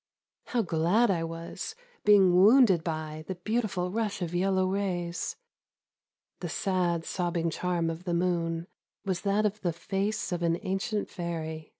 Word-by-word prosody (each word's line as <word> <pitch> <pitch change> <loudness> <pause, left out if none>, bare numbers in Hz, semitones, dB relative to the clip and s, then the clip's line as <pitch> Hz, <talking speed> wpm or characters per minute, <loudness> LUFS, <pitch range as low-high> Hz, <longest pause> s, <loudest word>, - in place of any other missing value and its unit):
How 240 -2 +1
glad 180 +7 +3
I 170 -3 0
was, 165 - -6 0.3
being 195 -3 +6
wounded 195 -2 +6
by 155 -2 -4
The 190 - -3
beautiful 190 -2 -1
rush 210 -3 -1
of 170 0 -4
yellow 190 +1 +2
rays! 185 -3 -2 1.0
The 175 - -4
sad 175 -2 0
sobbing 170 -2 -1
charm 175 0 -1
of 165 +3 -8
the 175 - -1
m')on 170 -1 0 0.4
Was 190 -2 -1
that 205 +1 +1
of 210 0 -1
the 175 - 0
face 195 +5 -2
of 175 -1 -2
an 170 0 +2
ancient 200 +3 -1
fairy. 160 -3 -5
180 Hz, 150 wpm, -29 LUFS, 170-195 Hz, 1.0 s, being